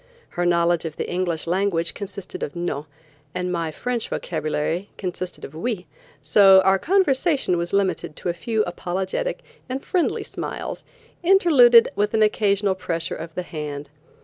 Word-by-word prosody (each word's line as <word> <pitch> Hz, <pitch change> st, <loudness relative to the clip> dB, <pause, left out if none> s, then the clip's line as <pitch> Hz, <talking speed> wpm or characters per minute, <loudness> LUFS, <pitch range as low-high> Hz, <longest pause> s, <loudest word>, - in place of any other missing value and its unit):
Her 175 Hz, 0 st, -1 dB
knowledge 170 Hz, -1 st, +2 dB
of 160 Hz, -2 st, -5 dB
the -, -, -3 dB
English 175 Hz, -3 st, -2 dB
language 170 Hz, -2 st, 0 dB
consisted 200 Hz, -1 st, -7 dB
of 145 Hz, -, -4 dB
"No" 165 Hz, -4 st, -3 dB, 0.5 s
and 180 Hz, 0 st, -2 dB
my 170 Hz, -2 st, -1 dB
French 235 Hz, +8 st, -3 dB
vocabulary 160 Hz, +3 st, -2 dB
consisted 185 Hz, -1 st, -5 dB
of 135 Hz, -, -11 dB
"Oui," 180 Hz, +3 st, -3 dB, 0.3 s
so 190 Hz, +6 st, +6 dB
our 190 Hz, 0 st, +3 dB
conversation 300 Hz, -, +2 dB
was 170 Hz, 0 st, -2 dB
limited 195 Hz, -5 st, 0 dB
to -, -, -4 dB
a -, -, 0 dB
few 220 Hz, +5 st, -1 dB
apologetic 190 Hz, -, -3 dB, 0.3 s
and 265 Hz, +2 st, -4 dB
friendly 360 Hz, -2 st, 0 dB
smiles -, -, -6 dB, 0.4 s
interluded 300 Hz, -11 st, +6 dB
with 210 Hz, +2 st, 0 dB
an 220 Hz, -, +4 dB
occasional 205 Hz, -2 st, +2 dB
pressure 165 Hz, -3 st, -3 dB
of 165 Hz, 0 st, -8 dB
the 180 Hz, -, -2 dB
hand. 150 Hz, -3 st, -6 dB
185 Hz, 150 wpm, -23 LUFS, 170-215 Hz, 0.5 s, so